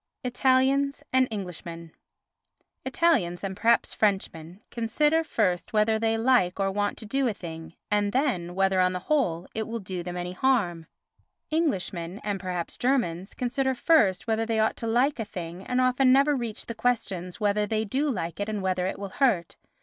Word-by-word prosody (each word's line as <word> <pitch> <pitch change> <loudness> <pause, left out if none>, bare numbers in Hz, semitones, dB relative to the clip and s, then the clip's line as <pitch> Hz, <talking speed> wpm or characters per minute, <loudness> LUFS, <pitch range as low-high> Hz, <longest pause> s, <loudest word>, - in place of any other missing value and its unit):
Italians 265 +3 +2
and 260 0 +4
Englishmen 170 -5 -7 0.9
Italians, 245 - +1
and 190 -1 -3
perhaps 230 +4 +2
Frenchmen, 190 -4 -1
consider 295 +8 +1
first 195 - -1
whether 220 +1 +3
they 225 0 +1
like 225 -6 +2
or 195 0 +1
want 205 +1 -1
to 220 - -9
do 270 +4 0
a 220 - -1
thing 165 -2 -8 0.2
and 205 -1 +2
then 210 - 0
whether, 190 0 +2
on 185 0 +2
the - - -1
whole, 180 - +1
it 220 -1 -3
will 230 +1 -3
do 185 -4 -5
them 175 +1 -5
any 180 0 -4
harm. 180 -7 0 0.6
Englishmen, 195 - -1
and 205 -2 -2
perhaps 180 -2 -4
Germans, 220 -9 0
consider 260 +1 0
first 230 - +3
whether 225 -1 0
they 225 -1 0
ought 220 - +1
to 230 - -4
like 245 +4 +2
a - - 0
thing 175 -2 -7
and 250 - 0
often 255 +1 +4
never 280 +2 +4
reach 235 -4 -4
the 230 - -5
questions 200 -7 -2
whether 210 0 +1
they 220 +1 0
do 275 +8 0
like 170 - -3
it 205 +1 -2
and 210 -2 -3
whether 185 -1 0
it - - -3
will 200 -1 -6
hurt. 195 - +1
210 Hz, 180 wpm, -26 LUFS, 180-255 Hz, 0.9 s, and